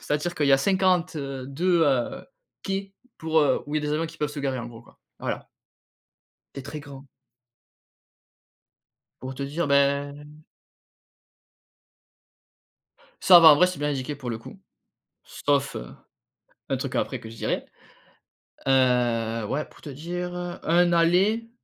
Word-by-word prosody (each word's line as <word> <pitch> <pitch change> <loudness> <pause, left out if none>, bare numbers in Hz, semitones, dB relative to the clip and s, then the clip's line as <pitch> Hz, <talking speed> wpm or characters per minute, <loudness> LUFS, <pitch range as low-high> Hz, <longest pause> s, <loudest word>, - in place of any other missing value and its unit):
C'est - - -5
à - - +4
dire 175 +4 -3
qu'il 145 -4 0
y 140 - +5
a 135 - +6
cinquante, 185 +1 +2
heu, 135 -3 -5
deux, 170 +4 +1
heu, 130 -5 0 0.4
quais 195 0 -3 0.3
pour, 160 0 +1
heu, 145 - +2
où 145 - -5
il 150 - 0
y - - -3
a - - -2
des 150 - 0
avions 160 +2 -1
qui - - -13
peuvent 150 - 0
se 145 - -5
garer, 135 -2 -2
en 120 - -5
gros, 115 -1 -11
quoi. - - -22 0.2
Voilà. - - -4 1.1
C'est 140 - -6
très 150 +3 -7
grand. 140 -1 -12 2.1
Pour 130 +1 -6
te 140 - -5
dire, 150 +4 -2
ben 140 +1 +1 2.9
Ça 180 -2 +9
va. 165 - +10
En - - +5
vrai, 180 +4 +5
c'est 180 - -5
bien 145 +1 -1
indiqué, 140 +1 -3
pour 130 -4 -6
le 115 - -4
coup. - - -12 0.7
Sauf, 140 -1 -1 0.9
un - - 0
truc - - -5
après - - -1
que 110 - -10
je 115 - -11
dirai. - - -2 1.0
Heu, 120 -4 +2
ouais, 140 +8 -2
pour - - -20
te 150 - -8
dire, 175 +5 -5 0.3
1 175 +1 +3
aller, 190 +7 +2
145 Hz, 160 wpm, -25 LUFS, 135-170 Hz, 2.9 s, va